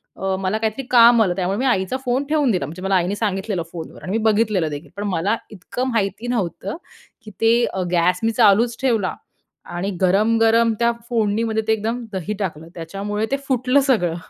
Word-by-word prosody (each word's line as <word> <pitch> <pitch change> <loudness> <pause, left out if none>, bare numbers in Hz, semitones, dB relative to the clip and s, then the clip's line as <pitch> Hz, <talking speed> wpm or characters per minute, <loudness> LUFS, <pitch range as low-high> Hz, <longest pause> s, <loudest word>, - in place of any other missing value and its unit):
अ, 190 0 -2
मला 195 +2 -1
काहीतरी 220 +4 -2
काम 235 -1 +7
आलं 180 - 0
त्यामुळे 190 +1 -1
मी 265 - 0
आईचा 240 -1 +1
फोन 255 +3 +1
ठेवून 295 -5 +2
दिला, 185 - 0
म्हणजे 170 +4 -9
मला 195 +1 +1
आईने 185 +2 +1
सांगितलेलं 200 -3 -2
फोनवर 165 -2 -8
आणि 185 - -5
मी 220 - +1
बघितलेलं 215 -6 +2
देखील 145 +1 -7
पण 205 - -3
मला 190 +4 0 0.2
इतकं 220 +6 -4
माहिती 225 +1 -1
नव्हतं, 200 - -3 0.5
की 215 - -10
ते 230 +1 +4 0.3
गॅस 180 +1 +2
मी 225 - +2
चालूच 225 +1 +3
ठेवला 225 -8 +1 0.6
आणि 185 +3 -2
गरम-गरम 225 +4 +3
त्या 235 0 +3 0.2
फोडणीमध्ये 220 -1 0
ते 220 - +4
एकदम 225 +3 -2
दही 190 +2 -3
टाकलं 165 -5 -4
त्याच्यामुळे 200 +5 -3
ते 275 - +2
फुटलं 255 +1 +2
सगळं 215 -12 +1
210 Hz, 180 wpm, -21 LUFS, 190-230 Hz, 0.6 s, काम